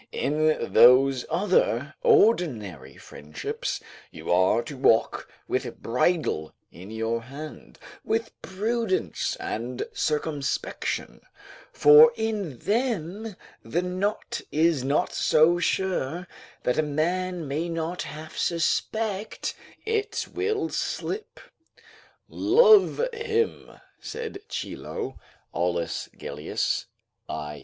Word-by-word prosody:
In 155 +2 0
those 130 +1 +6
other 155 - +1
ordinary 105 - +2
friendships, 75 +1 -5 0.3
you - - -6
are 95 +6 +3
to 140 - -8
walk 115 -3 +2 0.2
with - - -2
bridle 125 - 0 0.2
in 95 +3 -11
your 115 +1 -2
hand, 140 +6 -10 0.3
with 225 0 -1
prudence 205 - -1
and 120 +3 -4
circumspection, 150 -2 -2 0.5
for 465 -1 +8
in 210 - -2
them 215 - -2 0.3
the 175 +2 -2
knot 185 +4 -2
is 160 -3 +2
not 140 +3 +1
so 165 +3 +4
sure 175 -2 -1 0.4
that 125 - +1
a - - +6
man 170 +3 -1
may 155 +5 -2
not 165 +1 -3
half 155 +1 -8
suspect 205 +5 -1 0.3
it 440 0 -1
will 400 -2 -1
slip. 430 +2 -4 0.9
"Love 430 +3 +5
him," 455 -1 -1 0.3
said 445 -2 -6
Chilo, 135 - -5 0.3
[Aulus 85 -1 -1
Gellius, 75 +1 -2 0.4
i. 75 0 -5
165 Hz, 95 wpm, -26 LUFS, -, 0.9 s, for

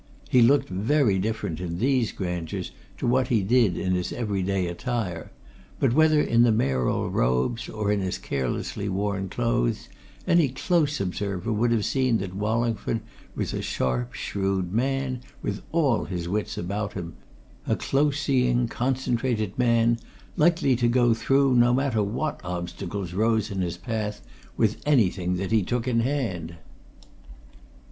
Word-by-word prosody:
He 125 - +6
looked 135 +5 +5
very 105 +2 +2
different 105 -6 -2
in 85 -1 -4
these 125 +1 +1
grandeurs 90 -4 -4 0.3
to - - -3
what 125 +1 +2
he 115 -6 +2
did 110 -4 +3
in 95 - -1
his 90 -1 -1
everyday 100 -4 -1
attire, 90 -2 -3 0.5
but 125 -4 +2
whether 155 +1 +5
in 115 -5 +3
the 120 -1 +5
Mayoral 65 - 0
robes 65 - 0
or 105 -2 -1
in 105 - +1
his 95 -1 -2
carelessly 70 +9 -3
worn 100 0 -2
clothes 115 - -1 0.4
any 170 -5 +4
close 150 +2 0
observer 100 +2 -2
would 115 +3 +1
have 110 -3 +1
seen 130 -4 +2
that 95 -2 -5
Wallingford 110 +1 -1 0.3
was - - -2
a - - -2
sharp, 60 -1 -1
shrewd 95 -2 -2
man 130 +1 -1 0.2
with 100 0 -3
all 145 -8 +2
his 90 -2 -4
wits 105 +4 -2
about 100 +3 -3
him 85 -3 -6 0.5
a - - +2
close 145 +1 +1
seeing, 125 -4 +2
concentrated 120 -4 -1
man, 115 -1 +3 0.4
likely 160 -4 +3
to 120 -1 +2
go 120 -1 +4
through, 135 +4 +2
no 120 0 +5
matter 130 -5 +1
what 125 +9 -2
obstacles 90 +1 -5
rose 110 +1 +1
in 95 -1 -2
his 85 -2 -2
path, 110 -3 -3 0.4
with 110 -1 +1
anything 95 -10 +2
that 95 +2 -3
he 110 -1 +4
took 120 +6 -2
in 120 -2 +2
hand. 115 - -2
110 Hz, 150 wpm, -25 LUFS, 95-125 Hz, 0.5 s, He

